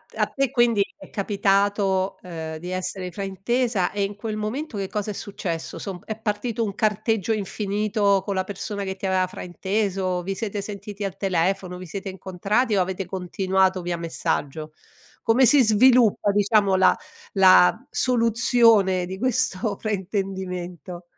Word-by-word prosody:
a - - +2
te 275 -2 -1
quindi 240 -5 +3
è - - -13
capitato, 195 -1 +1
ehm, 160 -3 -6
di 175 +3 -7
essere 185 0 -4
fraintesa 200 +3 -1
e 205 -1 -1
in 200 +1 -3
quel 215 +1 -4
momento 220 +5 -4
che 195 -1 -3
cosa 210 +1 -3
è - - -5
successo, 185 -5 -5
somb 190 -4 -6
è 220 0 -5
partito 220 +2 -2
un 200 -3 -3
carteggio 215 0 0
infinito 205 -1 0
con 200 - -2
la 190 - +1
persona 200 +1 -5
che 190 -1 -4
ti 195 - -6
aveva 190 -1 +2
frainteso, 190 0 -2
vi 195 +2 -4
siete 205 -1 -3
sentiti 205 0 -7
al 195 -2 -4
telefono, 185 -1 0
vi 185 - -8
siete 195 +3 -6
incontrati 195 +5 -1
o 190 - +3
avete 190 +1 -2
continuato 190 0 0
via 175 0 -3
messaggio? 160 -2 -3 0.5
Come 240 +4 +4
si 280 +1 +6
sviluppa, 225 -1 +4
diciamo, 205 -1 +3
la 190 0 +5 0.4
la 190 +4 +6
soluzione 230 -5 +3
di 190 +2 -6
questo 210 -3 0
fraintendimento? 185 -4 -4
195 Hz, 150 wpm, -24 LUFS, 185-215 Hz, 0.5 s, si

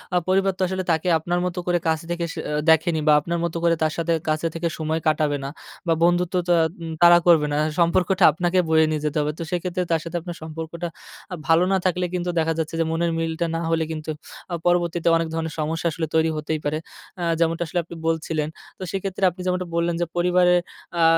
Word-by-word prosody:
আ - - +5
পরিবার 195 +1 +2
তো - - -6
আসলে 190 0 -2
তাকে 160 +2 0
আপনার 175 +3 -1
মতো 180 0 -3
করে 175 -1 +2
কাছে 160 0 0
থেকে 170 0 -1 0.2
অ্যা 150 0 -1
দেখেনি 160 0 +4
বা 150 - +7
আপনার 170 +2 -2
মতো 170 0 -2
করে 170 0 +4
তার 155 0 +1
সাথে 165 0 0 0.2
কাছে 155 +2 0
থেকে 170 0 -2
সময় 160 0 -1
কাটাবে 150 -2 +2
না 135 - -3 0.4
বা 165 - +4
বন্ধুত্বটা 175 0 +2 0.3
উম 165 -1 -5
তারা 175 0 +9
করবে 160 -3 +6
না। - - +1 0.2
সম্পর্কটা 180 +2 +2
আপনাকে 175 +2 +1
বয়ে 160 0 +5
নিয়ে 155 -1 -1
যেতে 150 +1 -1
হবে। 150 +1 0
তো 165 - -2
সেক্ষেত্রে 180 +1 -2
তার 165 - +3
সাথে 165 +1 -7
আপনার 175 0 -7
সম্পর্কটা 165 +2 -5 0.6
ভালো 165 +2 +5
না - - +4
থাকলে 180 0 +1
কিন্তু 180 0 -2
দেখা 165 0 +1
যাচ্ছে 160 0 -2
যে 165 - +2
মনের 170 +1 0
মিলটা 165 +1 -1
না 165 - -1
হলে 165 -1 +1
কিন্তু 155 0 -5 0.4
আ - - -2
পরবর্তীতে 175 -1 +1
অনেক 165 0 +1
ধরনের 160 -1 -3
সমস্যা 160 +2 -1
আসলে 160 +1 -3
তৈরি 160 0 +3
হতেই 155 +1 -2
পারে। 150 +1 0 0.4
আ - - -1 0.2
যেমনটা 165 +1 +1
আসলে 175 - 0
আপনি 170 - -10
বলছিলেন। 155 -1 -1 0.3
তো - - -7
সেক্ষেত্রে 195 0 -4
আপনি 180 +2 -10
যেমনটা 180 0 -1
বললেন 170 0 +1
যে, - - +2
পরিবারের 180 0 +4 0.4
আ - - +4
170 Hz, 215 wpm, -23 LUFS, 160-175 Hz, 0.6 s, তারা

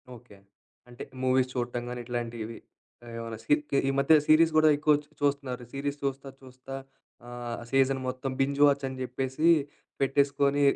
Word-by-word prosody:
Okay. 115 -4 -16 0.5
అంటే 120 - -9 0.2
movies 130 0 +2
చూడటం 120 -1 -3
గాని 125 0 -5
ఇట్లాంటివి 115 -2 -5 0.6
ఏమైనా 115 -1 -6
స్కిప్‌కి 145 +2 +1
ఈ - - +2
మధ్య 140 +3 +4
సీరీస్ 160 +1 +5
కూడా 155 0 +6
ఎక్కువ 150 +1 +3
చు 150 - -27
చూస్తున్నారు 140 -3 -1
సీరీస్ 140 +1 -3
చూస్తా, 135 0 -3
చూస్తా 130 0 -12 0.5
ఆహ్, 120 -1 -6
సీజన్ 135 0 +3
మొత్తం 130 +1 -3
బింజ్ 140 +1 0
వాచ్చని 140 -2 +1
జెప్పేసి 130 +5 -1 0.5
పెట్టేసుకొని 140 +1 +2
135 Hz, 140 wpm, -28 LUFS, 125-140 Hz, 0.6 s, కూడా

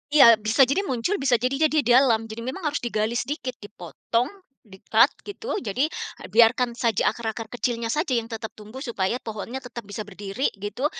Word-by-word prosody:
Iya 285 - +9 0.2
bisa 220 +5 +2
jadi 280 +10 +1
muncul 260 - -1
bisa 260 -3 +3
jadi 270 +6 +1
dia 305 -1 +2
dalam, 240 -2 +4
jadi 225 +1 -7
memang 260 +9 -5
harus 295 -1 -1
digali 220 -1 -1
sedikit 260 +1 -3
dipotong, 230 +2 -3 0.4
di-cut, 190 -3 +3 0.2
gitu. 415 +4 -5
Jadi 240 +6 0 0.5
biarkan 235 +2 +4
saja 235 -3 +1
akar-akar 225 -1 -4
kecilnya 235 -2 -2
saja 305 -2 0
yang 230 - -1
tetap 220 -1 -6
tumbuh 215 +5 -10
supaya 235 -4 -1
pohonnya 220 +3 -6
tetap 245 -1 -8
bisa 205 +2 -6
berdiri 205 +5 -3
gitu, 205 +7 -4
235 Hz, 170 wpm, -24 LUFS, 220-265 Hz, 0.5 s, Iya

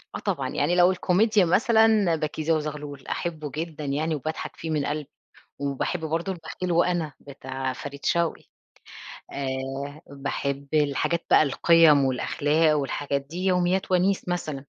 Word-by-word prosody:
آه - - -3
طبعًا. - - -2
يعني 160 +5 0
لو 180 +1 +6
الكوميديا 195 +3 +3
مثلًا 220 -1 +4
بَكيزة 155 +1 -1
وزغلول، 150 -3 -4
أحُبه 155 -4 -4
جدًا 155 -1 -5
يعني 155 +3 -1
وباضحك 155 +2 -5
فيه 165 - -6
من 150 -2 0
قلبي، 150 -1 -3 0.5
وباحب 140 +5 -2
برضه 165 +4 -2
البخيل 175 +1 -5
وأنا، 170 -2 +1
بتاع 130 -1 -5
فريد 140 +2 -8
شوقي. 170 -1 +1 0.9
آآ، 135 +2 -4
باحب 140 0 -3
الحاجات 150 +3 +1
بقى - - +6
القِيَّم 155 0 +5
والأخلاق 150 +4 +2
والحاجات 140 0 -2
دي، 170 +7 -6
يوميات 185 0 +1
وَنيس 185 +1 +2
مثلًا. 155 -6 -3
155 Hz, 135 wpm, -25 LUFS, 140-175 Hz, 0.9 s, لو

